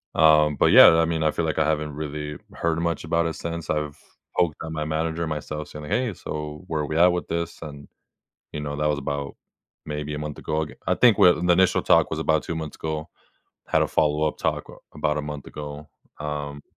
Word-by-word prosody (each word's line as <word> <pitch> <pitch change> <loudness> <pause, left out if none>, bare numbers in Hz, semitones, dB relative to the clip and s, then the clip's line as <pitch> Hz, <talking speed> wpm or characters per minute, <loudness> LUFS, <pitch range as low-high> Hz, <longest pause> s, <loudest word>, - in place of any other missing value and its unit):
Um, 75 -1 +5
but, - - +4
yeah, - - +10
I 80 - +4
mean, 80 -1 -1
I 80 - +3
feel 85 - -2
like 80 - -2
I 80 - +2
haven't 75 -1 -1
really 75 -1 -5 0.2
heard 85 0 -1
much 85 0 -1
about 85 +1 +1
it 80 - -1
since. 85 0 -5
I've 75 -1 -2 0.4
poked 85 -4 +2
on 80 - -6
my 75 -1 -2
manager 80 +1 -1
and 80 - -3
myself 75 0 -5
saying, 75 0 -8
"Hey. 120 +6 0
So, 75 0 -6
where 80 -3 -1
are 75 - -2
we 80 - -2
at 85 +2 +7
with 90 0 -3
this?" 85 0 -3
And, 70 -3 -9 0.6
you 75 - -5
know, 75 -1 -4
that 75 +1 0
was 75 - 0
about 70 0 -4 0.5
maybe 75 0 -4
a 75 - -4
month 75 -1 -5
ago, 80 0 -1
ag 75 - -9
I - - +3
think 120 -4 +5
well, 90 -4 +6
in 90 - -2
the 90 - +5
initial 95 +1 +3
talk - - +4
was - - -3
about 80 -1 +1
2 85 - -4
months 80 -2 -5
ago. 80 +1 -4 0.6
Had - - +2
a - - 0
follow-up 75 0 +1
talk - - -1
w - - -14 0.2
about 75 0 0
a - - -2
month 75 -1 -6
ago, 75 0 -8 0.3
um, 75 -1 -5
75 Hz, 235 wpm, -24 LUFS, 75-80 Hz, 0.6 s, yeah